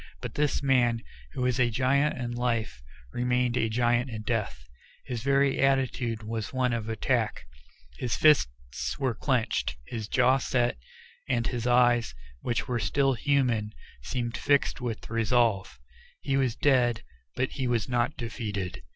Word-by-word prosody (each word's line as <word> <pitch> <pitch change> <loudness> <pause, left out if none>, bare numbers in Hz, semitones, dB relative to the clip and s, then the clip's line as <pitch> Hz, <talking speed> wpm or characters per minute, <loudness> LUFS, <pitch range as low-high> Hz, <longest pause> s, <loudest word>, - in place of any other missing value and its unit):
But - - -6
this 150 -1 0
man, 120 -4 +2 0.3
who 130 - -2
was 125 0 +1
a 120 -1 +4
giant 140 +5 +1
in 120 -1 -3
life, 115 - -2 0.3
remained 125 0 +1
a 115 -3 +1
giant 120 +2 +1
in 110 -2 -6
death 105 - -3 0.4
his 120 -3 -4
very 140 +1 +2
attitude 130 -4 +1
was 110 -2 -4
one 130 -2 0
of 115 -1 -3
attack; 110 - -1 0.5
his 120 -5 -1
fists 65 - +2
were 130 -4 0
clinched, 120 -1 -1
his 110 - -5
jaw 130 +3 +3
set, 120 - 0 0.5
and 120 -3 +1
his 120 -1 -2
eyes, 120 - +3 0.3
which 120 -1 -2
were 125 -2 -1
still 135 +1 +2
human, 120 -5 +1 0.3
seemed 120 - -3
fixed 140 -2 +1
with 120 -3 -4
resolve. 115 - +1 0.4
He 135 - -1
was 130 -4 +1
dead, 120 -5 +2 0.3
but 130 - -1
he 130 -3 -2
was 120 -4 0
not 120 +2 0
defeated. 105 -6 -4
120 Hz, 150 wpm, -28 LUFS, 115-130 Hz, 0.5 s, a